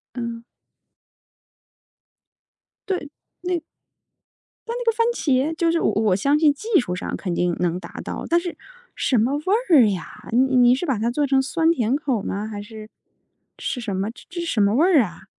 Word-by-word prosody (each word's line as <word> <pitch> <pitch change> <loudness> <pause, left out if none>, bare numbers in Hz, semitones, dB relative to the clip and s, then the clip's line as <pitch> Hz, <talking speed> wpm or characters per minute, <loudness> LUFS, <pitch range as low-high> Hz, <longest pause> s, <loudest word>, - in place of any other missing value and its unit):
嗯。 235 -1 -5 2.5
对， 300 - -8 0.3
那 360 -1 -1 1.1
但 465 - -3
那 - - -5
个 460 - +4
番 460 +1 +1
茄， 280 - +1
就 335 0 +1
是 335 - +1
我 - - +2
我 210 -3 +2
相 280 +9 +2
信 300 -2 +5
技 430 +6 +1
术 180 -7 -2
上 - - -4
肯 180 -3 -3
定 175 0 0
能 175 0 0
达 - - -10
到， - - -5
但 340 - +4
是 345 0 -6 0.4
什 255 - +1
么 240 +6 +2
味 295 - -4 0.3
儿 275 -10 +7
呀？ 185 -4 -6
你 260 +3 +3
你 245 0 +6
是 310 - -3
把 270 -8 0
它 230 +2 0
做 290 +4 0
成 270 0 +3
酸 325 +4 +1
甜 245 -5 +1
口 275 -5 -1
儿 - - -7
吗？ 205 +2 -3
还 210 -2 -6
是 215 0 -10 0.7
是 250 - -3
什 210 -5 -3
么， 195 +3 -1
这 - - -16
这 350 0 -6
是 - - -3
什 225 - +1
么 200 +1 +3
味 290 - +4
儿 355 -7 +5
啊？ 180 -2 -8
255 Hz, 210 characters per minute, -22 LUFS, 215-325 Hz, 2.5 s, 儿